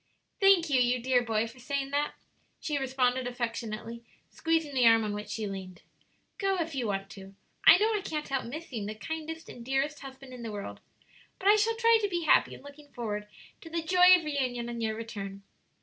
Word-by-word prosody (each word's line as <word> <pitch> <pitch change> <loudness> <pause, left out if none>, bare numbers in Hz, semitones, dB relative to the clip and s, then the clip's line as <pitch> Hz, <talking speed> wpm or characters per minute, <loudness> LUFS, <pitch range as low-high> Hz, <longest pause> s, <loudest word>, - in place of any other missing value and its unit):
"Thank 390 -4 +5
you, 260 -2 +4
you 245 +1 +2
dear 250 +1 +2
boy, 225 -2 0
for 230 +3 -11
saying 275 +2 -3
that," 290 +1 -1 0.4
she 295 -2 -2
responded, 260 -1 0
affectionately, 235 -1 -5 0.3
squeezing 325 -3 0
the 250 -3 +4
arm 225 -1 +6
on 210 -1 -2
which 210 0 -6
she 220 - -3
leaned; 190 -3 -7 0.6
"go 390 -1 +1
if 330 -1 -2
you 255 -4 -2
want 195 -1 -2
to; 195 -1 -11 0.3
I - - +11
know 435 +3 +2
I 420 - 0
can't 305 -5 -4
help 270 -1 -2
missing 245 -5 -6
the 215 - -5
kindest 320 +7 -6
and 240 - -10
dearest 270 +4 -1
husband 270 -1 -11
in 250 - -9
the 230 -2 -5
world, 205 -1 -6 0.6
but 385 - -3
I 415 - +8
shall 440 +2 +2
try 460 0 +4
to 410 - 0
be 345 -2 -2
happy 315 - +4
in - - -15
looking 285 +1 -13
forward 210 -3 -4 0.3
to 325 - -10
the 335 0 -2
joy 360 +2 +7
of 330 - -7
reunion 250 -5 -2
on 235 -1 -5
your 220 -1 -1
return." 200 -3 -7
260 Hz, 210 wpm, -29 LUFS, 225-320 Hz, 0.6 s, I